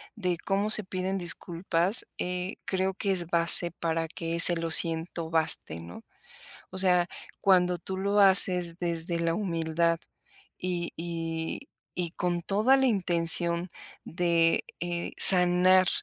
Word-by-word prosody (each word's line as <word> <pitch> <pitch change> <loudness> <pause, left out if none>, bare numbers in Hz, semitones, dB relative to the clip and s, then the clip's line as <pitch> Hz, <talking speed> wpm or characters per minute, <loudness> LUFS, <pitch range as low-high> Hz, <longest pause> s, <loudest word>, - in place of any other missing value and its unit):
de 180 -6 -3
cómo 200 +2 -2
se 215 - +6
piden 185 +1 -4
disculpas, 175 +2 -1
eh, 180 +1 -5
creo 190 0 -2
que 200 -1 -3
es 175 -3 -1
base, 170 +1 +3
para 165 -1 -4
que 165 0 -6
ese: 170 +1 +7
"Lo 165 -1 -4
siento", 165 0 +1
baste, 160 - -1
¿no? 85 +1 -12 0.7
O 185 - -10
sea, 180 -2 +4 0.3
cuando 180 -2 +2
tú 190 +3 -7
lo 200 +2 0
haces 180 -3 +4
desde 170 0 -4
la 165 0 -1
humildad, 165 -3 -2 0.6
y 175 -1 -4
y 165 +6 -6 0.3
y 175 -2 -4
con 175 -1 -3
toda 215 +9 +1
la 265 0 +1
intención 170 -3 +2 0.4
de, 170 -1 0 0.2
eh, 175 0 -5
sanar 180 0 +5
175 Hz, 135 wpm, -26 LUFS, 165-185 Hz, 0.7 s, ese